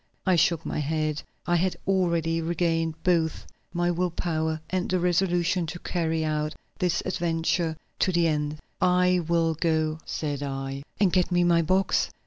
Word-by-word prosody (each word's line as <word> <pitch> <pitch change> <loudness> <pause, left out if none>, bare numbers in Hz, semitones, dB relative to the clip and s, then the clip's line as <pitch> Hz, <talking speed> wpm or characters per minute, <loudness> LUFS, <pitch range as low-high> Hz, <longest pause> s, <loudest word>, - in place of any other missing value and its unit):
I 185 -2 +4
shook 165 0 +2
my - - -2
head; 155 0 -1 0.2
I 175 - +2
had 185 +2 0
already 170 -4 +1
regained 165 -1 0
both 165 -3 +1 0.3
my 175 0 +1
will 180 +1 0
power 160 -2 -1
and 185 -1 -1
the 185 - +2
resolution 175 0 +1
to 170 - -5
carry 165 -2 -1
out 150 0 -1 0.2
this 180 -1 +1
adventure 165 -2 0 0.2
to 185 - +3
the 170 -1 +3
end. 150 -1 -1 0.2
"I 180 0 +4
will 165 -1 +2
go," 155 -1 0
said 145 -2 -3
I. 135 -1 -4 0.2
"And 195 -4 +3
get 185 -1 +2
me 175 0 +3
my 170 -1 +4
box?" 185 +4 +2
170 Hz, 160 wpm, -26 LUFS, 160-180 Hz, 0.3 s, I